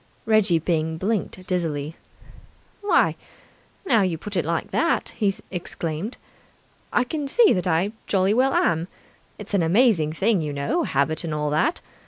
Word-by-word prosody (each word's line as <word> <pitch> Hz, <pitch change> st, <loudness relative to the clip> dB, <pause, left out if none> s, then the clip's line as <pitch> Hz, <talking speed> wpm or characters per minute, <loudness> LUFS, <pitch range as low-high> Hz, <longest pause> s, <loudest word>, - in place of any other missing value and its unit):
Reggie 215 Hz, -6 st, +3 dB
Byng 160 Hz, -1 st, -1 dB
blinked 190 Hz, -1 st, -2 dB
dizzily. 160 Hz, -4 st, -2 dB, 0.9 s
"Why, 410 Hz, -, +3 dB, 0.7 s
now 235 Hz, -, +4 dB
you 180 Hz, -4 st, 0 dB
put 205 Hz, +5 st, -7 dB
it 175 Hz, -, +1 dB
like 165 Hz, +1 st, -2 dB
that," 335 Hz, -, +1 dB
he 205 Hz, -3 st, +1 dB, 0.2 s
exclaimed, 175 Hz, +3 st, -4 dB, 0.7 s
"I 245 Hz, -, +3 dB
can 290 Hz, +2 st, -4 dB
see 450 Hz, -, +5 dB
that 180 Hz, 0 st, -1 dB
I 180 Hz, +4 st, +1 dB, 0.2 s
jolly 195 Hz, 0 st, +2 dB
well 260 Hz, +4 st, +2 dB
am! 165 Hz, +1 st, +1 dB, 0.5 s
It's 210 Hz, 0 st, -10 dB
an 200 Hz, -, +3 dB
amazing 170 Hz, -3 st, +3 dB
thing, 200 Hz, +2 st, +1 dB
you 150 Hz, -2 st, -3 dB
know, 140 Hz, 0 st, -1 dB
habit 140 Hz, +5 st, 0 dB
and 160 Hz, -2 st, -3 dB
all 150 Hz, -1 st, -1 dB
that. 295 Hz, -, +1 dB
180 Hz, 155 wpm, -23 LUFS, 160-215 Hz, 0.9 s, see